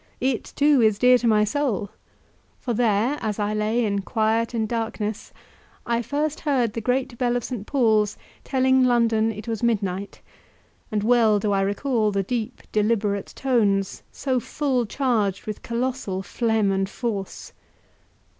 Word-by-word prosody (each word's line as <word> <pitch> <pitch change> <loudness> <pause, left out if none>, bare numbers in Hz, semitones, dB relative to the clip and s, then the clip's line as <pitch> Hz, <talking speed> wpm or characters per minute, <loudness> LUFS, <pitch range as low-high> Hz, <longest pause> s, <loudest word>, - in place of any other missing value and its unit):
It, 260 -2 -1
too, 290 -2 +4
is 215 -2 +3
dear 250 +2 +5
to 240 - 0
my 215 -1 +4
soul; 210 -4 -1 0.7
for 245 - -3
there, 230 +4 +1
as 215 -2 -2
I 210 0 -1
lay 215 +3 +1
in 200 -1 0
quiet 225 +3 0
and 220 -1 0
darkness, 220 -2 -3 0.5
I 235 0 0
first 295 +5 -2
heard 255 -8 0
the 230 - -3
great 250 +1 -1
bell 245 -1 +1
of 245 - -4
St. 230 -5 -5
Paul's 220 -6 +2 0.3
telling 260 -1 +3
London 230 -3 +3
it 215 +2 -9
was 225 -2 -3
midnight, 200 -4 -1 0.7
and 210 -1 0
well 225 -2 +4
do 205 0 -1
I 195 -1 +2
recall 215 +3 0
the 195 -1 0
deep, 235 +3 -4
deliberate 210 -2 0
tones, 205 -7 +1
so 260 -2 -1
full 255 -1 -1
charged 220 -7 0
with 215 -1 -5
colossal 235 -5 -3
phlegm 220 0 0
and 195 0 0
force. 205 -4 -5
225 Hz, 155 wpm, -24 LUFS, 210-250 Hz, 0.7 s, dear